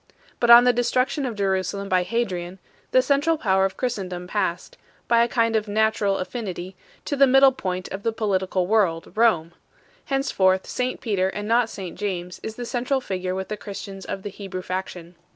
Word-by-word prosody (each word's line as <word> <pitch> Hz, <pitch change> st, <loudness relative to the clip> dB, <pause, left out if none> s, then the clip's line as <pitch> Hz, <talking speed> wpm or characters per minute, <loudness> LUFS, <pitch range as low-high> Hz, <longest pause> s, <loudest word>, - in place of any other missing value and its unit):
But 240 Hz, -, +1 dB
on 235 Hz, +1 st, +10 dB
the 250 Hz, 0 st, +4 dB
destruction 255 Hz, +3 st, 0 dB
of 235 Hz, -, -4 dB
Jerusalem 195 Hz, 0 st, -1 dB
by 185 Hz, -1 st, +2 dB
Hadrian, 180 Hz, -4 st, -2 dB, 0.3 s
the 255 Hz, -, +4 dB
central 290 Hz, +4 st, +2 dB
power 190 Hz, -7 st, +2 dB
of 195 Hz, -, -3 dB
Christendom 185 Hz, -8 st, -3 dB
passed, 180 Hz, -2 st, -2 dB, 0.3 s
by 235 Hz, 0 st, +4 dB
a -, -, +1 dB
kind 230 Hz, -1 st, +1 dB
of 215 Hz, -1 st, 0 dB
natural 210 Hz, -1 st, +1 dB
affinity, 185 Hz, -3 st, -5 dB, 0.3 s
to 285 Hz, -, -1 dB
the 275 Hz, 0 st, +5 dB
middle 270 Hz, +1 st, +6 dB
point 185 Hz, -7 st, -4 dB
of 195 Hz, -, -6 dB
the 230 Hz, -, 0 dB
political 190 Hz, -4 st, 0 dB
world, 185 Hz, -5 st, +1 dB
Rome; 215 Hz, -8 st, +2 dB, 0.5 s
henceforth, 190 Hz, -9 st, +1 dB
St 255 Hz, 0 st, -3 dB
Peter 195 Hz, -5 st, 0 dB
and 205 Hz, +2 st, -5 dB
not 230 Hz, 0 st, +3 dB
St 185 Hz, -5 st, -7 dB
James 180 Hz, -3 st, -4 dB
is 220 Hz, -, -6 dB
the 245 Hz, -, -5 dB
central 250 Hz, +3 st, -1 dB
figure 185 Hz, -6 st, -3 dB
with 190 Hz, 0 st, -4 dB
the 215 Hz, -, -3 dB
Christians 195 Hz, -1 st, -8 dB
of 195 Hz, -, -5 dB
the 205 Hz, -, -4 dB
Hebrew 195 Hz, -2 st, -7 dB
fac 185 Hz, +1 st, -3 dB
tion. 175 Hz, -1 st, -11 dB
205 Hz, 190 wpm, -23 LUFS, 185-235 Hz, 0.5 s, on